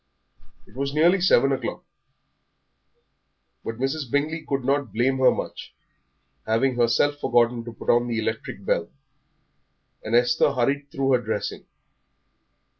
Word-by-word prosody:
It - - -21
was 140 +2 -3
nearly 175 +5 +4
seven 135 -7 +4
o'clock. 135 - -3 1.8
But 115 - -5
Mrs. 135 +1 -2
Bingley 150 +5 -1
could 135 -3 -2
not 140 -3 0
blame 130 +5 0
her 130 - +6
much, - - -5 0.7
having 115 +4 +2
herself 120 +5 +2
forgotten 120 -2 +2
to 120 - -7
put - - -1
on 120 0 +2
the 115 -1 -2
electric 110 - -4
bell, - - 0 1.1
and 110 +2 -1
Esther 120 +3 +3
hurried 140 +3 -1
through 135 0 -1
her 125 -2 +3
dressing. 110 -2 -4
130 Hz, 130 wpm, -24 LUFS, 120-140 Hz, 1.8 s, her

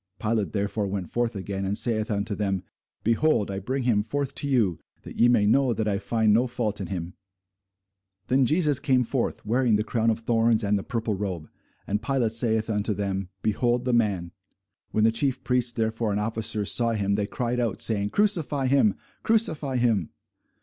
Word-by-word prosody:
Pilate 110 -2 -1
therefore 100 0 -1
went 95 -3 -4
forth 120 -2 -1
again, 95 0 -4
and 100 +2 -1
saith 110 -3 +1
unto 105 0 -2
them, 95 -3 -2 0.4
Behold, 115 -2 +2
I 95 - -3
bring 130 +7 -3
him 115 -4 +2
forth 140 +5 -3
to 145 - 0
you, 110 - +1 0.2
that - - -10
ye 120 - +4
may 120 -4 +3
know 130 +3 +3
that 110 - -1
I 100 -2 0
find 110 +1 +1
no 120 +4 +3
fault 120 -4 -2
in 95 - -4
him. 90 -1 -5 1.1
Then 130 - +2
came 135 - +4
Jesus 150 -3 +2 0.3
forth, 125 -4 -2
wearing 120 +1 +2
the 105 - +1
crown 115 +1 0
of 115 0 -1
thorns, 115 -1 +2
and 105 0 +1
the 100 - 0
purple 115 +1 -2
robe. 95 -6 -4 0.3
And 105 +2 -2
Pilate 120 -2 0
saith 110 -1 +1
unto 105 -1 -1
them, 95 -1 -3
Behold 120 +3 +1
the 125 - +1
man! 100 -7 +1 0.6
When 110 - +1
the 110 - +5
chief 130 +3 0
priests 125 -1 +1
therefore 110 -1 -1
and 100 0 0
officers 110 -1 -1
saw 115 +3 +2
him, 100 -2 0
they 100 0 0
cried 125 +2 -2
out, 115 -4 -1
saying, 105 -2 +1
Crucify 165 - +1
him, 140 +11 +3 0.3
crucify 155 - +1
him. 115 -9 +1
110 Hz, 190 wpm, -25 LUFS, 100-125 Hz, 1.1 s, the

